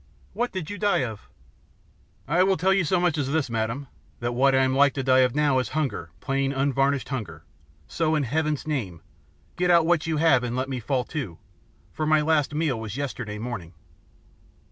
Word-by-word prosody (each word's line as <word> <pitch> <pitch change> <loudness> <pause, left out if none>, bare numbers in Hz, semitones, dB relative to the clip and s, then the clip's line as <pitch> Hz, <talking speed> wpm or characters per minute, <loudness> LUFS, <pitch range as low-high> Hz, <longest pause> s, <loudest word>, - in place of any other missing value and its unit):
What 245 +1 -1
did 185 -2 -5
you 205 - -6
die 200 -8 +2
of?" 110 -4 -7 1.0
"I 170 +5 +2
will 190 0 +3
tell 190 +5 +3
you 195 -1 +2
so 175 +3 +1
much 175 -3 +1
as 140 -1 -1
this, 150 -5 0
madam 115 +5 -2 0.3
that 120 0 -2
what 135 +2 +3
I 130 - +4
am 130 0 +1
like 140 +1 +4
to 135 - -2
die 130 0 +4
of 125 -1 +3
now 145 -3 +3
is 125 - -2
hunger, 140 -9 -2
plain, 135 +3 0
unvarnished 135 0 0
hunger, 95 - -5 0.4
so, 160 -1 0
in 150 - +1
Heaven's 150 +3 -1
name, 110 - -3 0.6
get 180 0 +1
out 170 -2 +5
what 165 -2 +2
you 160 -1 0
have 150 -5 +4
and 120 0 -3
let 130 +1 -2
me 130 -2 -3
fall 125 +2 -1
to, 110 - -4 0.6
for 155 - -2
my 155 0 +4
last 150 -1 +1
meal 150 -7 0
was 110 +1 -6
yesterday 120 -6 -4
morning." 105 -7 -6
140 Hz, 200 wpm, -25 LUFS, 125-155 Hz, 1.0 s, out